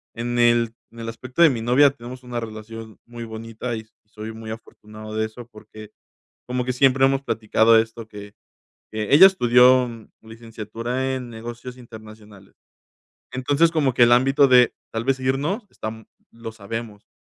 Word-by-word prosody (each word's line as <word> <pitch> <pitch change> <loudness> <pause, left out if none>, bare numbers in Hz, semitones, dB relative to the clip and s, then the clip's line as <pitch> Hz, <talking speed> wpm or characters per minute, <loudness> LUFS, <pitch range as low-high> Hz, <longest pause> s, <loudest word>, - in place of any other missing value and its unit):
en 120 +1 -3
el 120 -1 +3 0.2
en 115 - -14
el 115 - -5
aspecto 130 +6 -5
de 165 - +8
mi 120 -4 -3
novia 125 +5 +4
tenemos 125 -1 -10
una 120 -1 -5
relación 110 -1 -9
muy 120 0 -9
bonita 115 +2 -6
y - - -5
s 110 - -24
soy 110 +1 -9
muy 110 0 -8
afortunado 110 -1 -11
de 110 0 0
eso 115 +2 -10
porque 110 -2 -14 0.6
como 125 0 -2
que 125 - -2
siempre 135 +1 +3
hemos 135 0 +1
platicado 110 0 +3
esto 110 0 -5
que, 105 -1 -11 0.6
que 110 +3 -2
ella 180 +7 +10
estudió 125 -6 +4 0.3
licenciatura 115 +3 -5
en 125 -2 -7
negocios 120 +2 -9
internacionales. 110 -4 -14 0.8
Entonces 140 +6 +2
como 145 -6 0
que 125 - +3
el 120 - +4
ámbito 135 +3 +4
de, 125 -1 +5 0.2
tal 115 0 -3
vez 135 +1 0
irnos, 145 - -2
esta 110 0 -8 0.2
lo 115 -1 -9
sabemos 110 0 -8
115 Hz, 165 wpm, -22 LUFS, 110-125 Hz, 0.8 s, ella